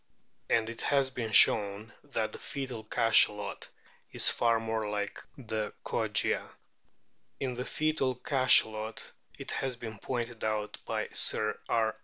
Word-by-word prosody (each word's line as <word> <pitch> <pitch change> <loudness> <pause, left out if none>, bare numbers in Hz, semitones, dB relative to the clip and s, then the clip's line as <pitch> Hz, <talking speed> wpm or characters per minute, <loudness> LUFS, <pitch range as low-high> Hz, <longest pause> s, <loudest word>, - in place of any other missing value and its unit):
And 110 -1 +2
it 115 0 -7
has 140 -2 +1
been 115 -4 -4
shown 105 +1 +4
that 115 -6 -2
the - - -10
foetal 130 -5 -5
Cachalot 110 -2 +3 0.4
is - - -3
so - - +7
far 115 -1 +2
more 110 -1 -3
like 105 -1 -4 0.2
the 110 -4 -4
Kogia. - - -1 0.8
In 130 -2 -2
the 125 +1 -5
fcetal 145 -6 -1
Cachalot 110 -5 +2 0.3
it - - -7
has 135 -2 -2
been 110 -3 -8
pointed 120 -1 -4
out 105 -1 -2
by - - -2
Sir 110 0 +2
R. 110 -1 +1
115 Hz, 140 wpm, -30 LUFS, 110-130 Hz, 0.8 s, so